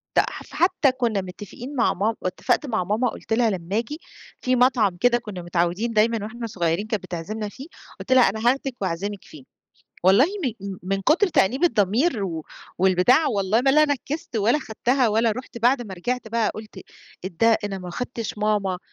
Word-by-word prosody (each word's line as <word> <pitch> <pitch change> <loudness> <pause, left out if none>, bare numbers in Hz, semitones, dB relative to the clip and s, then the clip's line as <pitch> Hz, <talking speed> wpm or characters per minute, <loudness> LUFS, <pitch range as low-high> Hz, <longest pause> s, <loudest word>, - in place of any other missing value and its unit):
ده، - - +5
ف - - -9
فحتى 325 -4 +2
كنا 235 -6 -1
متفقين 205 +9 -9
مع 250 - +2
ماما 220 +4 0
اتفقت 185 +9 0
مع 220 -8 -1
ماما 215 +6 0
قُلت - - -5
لها 230 0 +3
لمّا 190 +1 -3
آجي، 265 +8 -3 0.4
فيه 255 0 +1
مطعم 240 -7 +3
كده 240 +5 +3
كنا 210 -6 -7
متعودين 175 +6 -1
دايمًا 220 0 +2
وإحنا 230 +2 -6
صغيرين 175 0 -1
كانت 215 -4 -2
بتعزمنا 205 +5 -5
فيه، 270 +8 -11 0.3
قُلت - - -7
لها 260 -1 +7
أنا 220 - -5
هاخدك 270 -1 -1
وأعزمِك 195 +2 -3
فيه، 145 -4 -14 0.6
والله 195 +8 +6 0.4
م 195 -1 -5
من 195 +1 -1
كتر 320 - +3
تأنيب 260 - +2
الضمير 220 - +2
و 160 -4 -4 0.3
والبتاع 190 - +4
والله 205 0 +1
ما 270 +1 +3
لا 305 +2 +5
نفذت 285 -1 -3
ولا 225 +7 +3
خدتها 250 0 0
ولا 225 +2 +2
رُحت، 250 +1 -8
بعد 245 +2 +3
ما 195 -4 -8
رجعت 245 +5 -3
بقى 230 -1 +1
قُلت 215 -2 -10 0.5
إيه 185 - -3
ده 230 -1 +5
أنا 195 -2 -3
ما 180 -1 -8
اخدتش 230 +2 -5
ماما، 205 -3 0
220 Hz, 185 wpm, -23 LUFS, 195-250 Hz, 0.6 s, لها